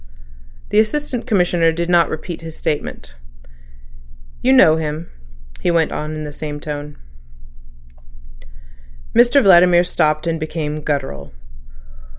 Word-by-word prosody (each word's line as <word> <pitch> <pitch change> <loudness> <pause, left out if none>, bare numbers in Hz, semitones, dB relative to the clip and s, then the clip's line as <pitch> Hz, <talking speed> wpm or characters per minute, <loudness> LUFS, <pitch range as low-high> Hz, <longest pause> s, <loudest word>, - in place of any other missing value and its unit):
The 210 - +3
Assistant 250 +2 -1
Commissioner 175 -6 +2
did 170 +1 -3
not 175 -1 +3
repeat 160 +2 -6
his 160 -1 -9
statement. 150 - -4 1.3
"You - - +2
know 155 +4 +6
him," 155 +1 -5 0.5
he - - -1
went 165 -2 +1
on 155 +1 -4
in 155 - -5
the 150 - -6
same 145 0 -6
tone. 150 0 -7 2.2
Mr 240 +4 +5
Vladimir 175 -2 +6
stopped, 155 -3 0
and 165 -1 -1
became 155 -1 -4
guttural. 135 - -4
160 Hz, 120 wpm, -18 LUFS, 150-175 Hz, 2.2 s, know